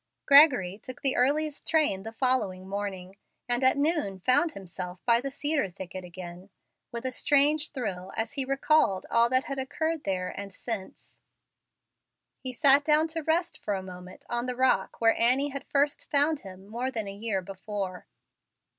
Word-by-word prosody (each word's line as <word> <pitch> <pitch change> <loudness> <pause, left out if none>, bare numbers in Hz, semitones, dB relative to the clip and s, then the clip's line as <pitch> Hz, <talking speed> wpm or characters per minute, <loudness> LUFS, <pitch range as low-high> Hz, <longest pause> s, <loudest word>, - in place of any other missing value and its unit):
Gregory 255 - +6
took 255 +4 -10
the 270 -1 +3
earliest 290 +4 0
train 300 -12 +2
the 225 - -7
following 225 -7 -1
morning, 195 -2 -5 0.3
and 245 +1 0
at 260 +2 +4
noon 285 - 0
found 260 - +2
himself 180 -1 -8
by 235 -1 +4
the 275 - -4
cedar 285 -3 -1
thicket 185 0 -8
again, 180 +1 -10 0.4
with 235 +1 -6
a 260 - 0
strange 295 +4 +3
thrill, 190 -9 -5
as 225 - -2
he 275 - +1
recalled 270 -7 +2
all 235 0 +4
that 255 +1 +2
had 275 -1 -5
occurred 315 +4 -2
there 185 -2 -2
and 200 +1 -7
since. 200 -1 -6 1.2
He 260 - -5
sat 280 +2 +5
down 310 +2 +3
to 325 +1 -3
rest 330 +3 -1
for 205 - -2
a 190 - -5
moment 180 0 -11
on 240 +1 -2
the 250 - -2
rock 260 +1 +1
where 225 -1 +4
Annie 255 +5 +3
had 275 0 -7
first 290 0 0
found 290 +1 +2
him 190 -3 -12
more 235 +5 -3
than 220 -5 -3
a 195 - -5
year 200 -2 -2
before. 195 -1 -6
245 Hz, 170 wpm, -27 LUFS, 195-280 Hz, 1.2 s, Gregory